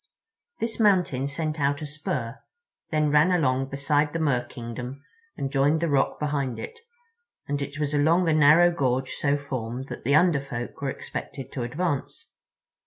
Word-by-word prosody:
This 225 0 -3
mountain 180 - +3
sent 155 +2 -3
out 140 +1 +1
a - - -3
spur, 140 -6 -4 0.5
then 155 -2 +1
ran 150 +5 +5
along 135 -6 +2
beside 145 +2 +1
the 165 - -1
Merkingdom 125 -2 -3 0.4
and 135 - -3
joined 145 +3 +3
the 170 0 0
rock 135 -1 +1
behind 140 -4 -1
it; 460 - -8 0.7
and 145 0 -2
it 140 +1 -5
was 150 -1 -1
along 160 +5 +3
the 165 - +3
narrow 155 +3 +6
gorge 130 -5 0
so 145 0 +1
formed 130 -2 -5
that - - -7
the 140 +4 +3
Under 155 -3 +4
Folk 120 -2 -6
were 140 - -1
expected 135 0 -6
to 130 - -4
advance. 145 +4 -3
145 Hz, 165 wpm, -26 LUFS, 135-155 Hz, 0.7 s, narrow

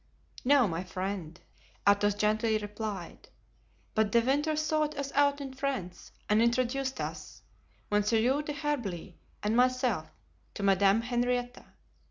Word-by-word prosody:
"No, 270 -2 +5
my 170 0 -3
friend," 185 -2 -5 0.5
Athos 205 0 +4
gently 215 +1 +1
replied, 210 -1 -6 0.6
"but 215 -1 +1
De 235 - +5
Winter 290 +6 +1
sought 310 -1 0
us 280 -1 -3
out 285 0 +3
in 270 -2 -6
France 260 -10 -4 0.2
and 210 +1 +3
introduced 255 +3 0
us, - - -6 0.5
Monsieur 225 +6 +2
d'Herblay 285 - -3 0.3
and 210 +2 +1
myself, 250 -9 +2 0.5
to 200 - -5
Madame 195 +2 +4
Henrietta. 245 +1 -1
235 Hz, 120 wpm, -30 LUFS, 205-270 Hz, 0.6 s, No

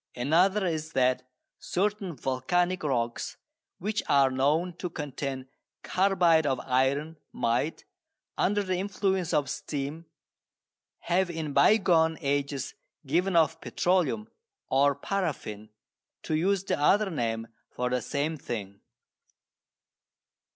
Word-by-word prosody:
Another 180 +10 +3
is 160 -2 -2
that 130 0 +1 0.3
certain 195 -2 -1
volcanic 175 +9 0
rocks 120 -5 -2 0.4
which 210 +3 -2
are 140 -2 +5
known 155 +7 +1
to 180 - -4
contain 140 -4 -5 0.4
carbide 175 -5 +3
of 130 -2 0
iron 140 +5 0
might, 120 +7 -1 0.5
under 205 +1 +1
the 185 -2 -1
influence 190 -2 -1
of 145 -2 +2
steam, 145 +5 -4 0.9
have 180 +1 +1
in 160 -4 -4
bygone 165 -6 +4
ages 140 -2 -1 0.3
given 175 +6 +1
off 165 0 +3
petroleum, 185 +4 0 0.4
or 140 +1 +4
paraffin, 140 - -3 0.5
to - - -3
use 190 +4 +1
the 195 - -1
other 195 +7 +3
name 115 -6 -2 0.2
for 125 0 -2
the 125 0 +1
same 150 +6 -2
thing. 100 -7 -6
155 Hz, 110 wpm, -28 LUFS, 135-180 Hz, 0.9 s, are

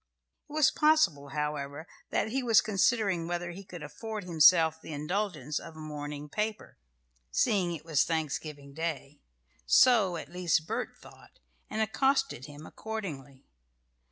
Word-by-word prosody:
It - - -11
was 305 -2 +4
possible, 305 - +3
however, 150 +1 -3 0.2
that 220 - 0
he 265 +4 -1
was 230 -4 +5
considering 200 -5 +1
whether 175 0 -3
he 195 +3 -9
could 180 -4 -9
afford 215 +7 -6
himself 160 -1 +5
the 160 - -8
indulgence 155 -2 -2
of 165 - -11
a - - -11
morning 150 -1 -6
paper 210 - -4 0.5
(seeing 175 - +1
it 155 - -11
was 160 -4 +3
Thanksgiving 150 -3 -3
Day); 150 -3 -4 0.5
so, 205 - +5
at 165 - -9
least, 175 -3 +1
Bert - - -4
thought, - - -17 0.3
and 220 - 0
accosted 265 - 0
him 145 +1 -11
accordingly. 155 -14 -7
165 Hz, 140 wpm, -30 LUFS, 150-210 Hz, 0.5 s, was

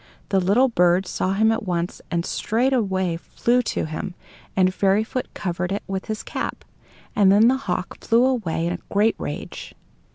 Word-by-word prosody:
The 195 - +3
little 205 +9 +4
bird 180 -4 +3
saw 185 +1 -1
him 220 +3 +3
at 225 - 0
once, 175 -4 -3
and 170 -1 -1
straightway 210 -8 0
flew 240 +8 +1
to 235 - -2
him, 155 +4 -5 0.4
and 185 -1 +3
Fairyfoot 205 +6 0
covered 180 0 -2
it 200 - -2
with 190 0 -4
his 215 0 -4
cap. - - -4 0.5
And 200 -2 +5
then 210 +3 +6
the 265 - +2
hawk 180 +1 -3
flew 235 +2 +4
away 215 -11 0
in 175 - 0
a 180 - -5
great 210 +3 +3
rage. - - -6
195 Hz, 170 wpm, -23 LUFS, 180-225 Hz, 0.5 s, then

